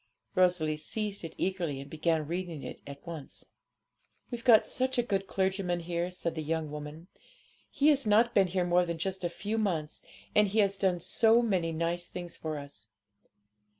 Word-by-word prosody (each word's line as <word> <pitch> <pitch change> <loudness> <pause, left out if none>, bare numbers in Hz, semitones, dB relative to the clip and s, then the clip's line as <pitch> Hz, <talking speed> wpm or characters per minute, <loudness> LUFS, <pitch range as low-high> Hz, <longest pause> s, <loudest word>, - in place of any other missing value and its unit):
Rosalie 175 -4 +2
seized 205 +6 -3
it 165 - -7
eagerly, 175 -7 -1
and 140 - -8
began 160 +1 0
reading 170 -2 -4
it - - -8
at 140 +2 -10
once. 165 -5 -7 0.8
'We've 240 -1 -5
got 225 -4 +7
such 260 0 -1
a 245 - +3
good 195 -4 -1
clergyman 190 -2 0
here,' 170 +1 -2
said 180 -2 -3
the 160 - -4
young 155 0 -2
woman; 150 +2 -7 0.6
'he 290 +2 +3
has 280 -6 +3
not 225 +3 +4
been 195 -2 +5
here 180 0 0
more 175 +1 +4
than 170 -1 -3
a 185 +1 -2
few 210 +6 -3
months, 165 -8 -1 0.3
and 210 0 +5
he 200 +3 -3
has 200 -2 +4
done 185 -3 +1
so 230 +6 +4
many 185 -7 +1
nice 170 +2 -1
things 175 -1 -6
for 155 -1 -4
us. 140 -8 -9
175 Hz, 180 wpm, -30 LUFS, 160-200 Hz, 0.8 s, got